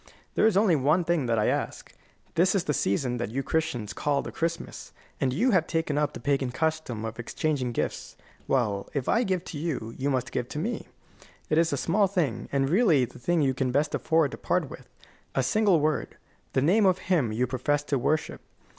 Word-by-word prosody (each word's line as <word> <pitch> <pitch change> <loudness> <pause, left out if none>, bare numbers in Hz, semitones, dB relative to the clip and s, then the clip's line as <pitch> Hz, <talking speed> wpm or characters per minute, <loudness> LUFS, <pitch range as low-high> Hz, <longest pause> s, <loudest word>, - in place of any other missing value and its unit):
There - - +4
is 205 -4 +2
only 200 -5 +4
one 150 +6 +2
thing 165 -6 0
that 115 -1 +1
I 105 - +2
ask. - - -3 0.4
This 185 +4 +3
is 190 - +2
the 150 - -1
season 125 +2 0
that 120 -2 -3
you 135 +5 -2
Christians 125 -11 -2
call 145 -1 0
the - - -6
Christmas, 165 0 -4 0.3
and 130 - +1
you 235 - +2
have 180 -5 +3
taken 160 -3 -1
up 150 0 0
the - - -7
pagan 140 -2 0
custom 155 -7 -2
of 110 +1 -6
exchanging 130 +1 -1
gifts. - - -3 0.3
Well, 105 -7 0
if 135 -3 -1
I 230 - +3
give 190 -6 0
to 150 - -6
you, 140 -8 -3
you 140 +2 0
must 130 -2 -1
give 120 - -3
to - - -6
me. 220 +10 -3 0.6
It 155 - +4
is 165 0 +2
a 140 - 0
small 200 +8 +2
thing, 170 - -1
and 135 -1 +1
really 165 - +4
the 125 - -14
thing 165 +5 +1
you 135 -1 +2
can 130 -1 -1
best 145 +3 +1
afford 160 -4 +2
to - - -7
part - - 0
with: - - -11 0.5
a 135 - +2
single 195 - +3
word 155 +1 -1 0.4
the 130 - +2
name 195 +6 +4
of 185 -1 +3
Him 140 -11 +3
you 120 +4 +1
profess 135 +3 0
to 140 -2 -1
worship. 150 +5 -1
145 Hz, 215 wpm, -27 LUFS, 125-170 Hz, 0.6 s, There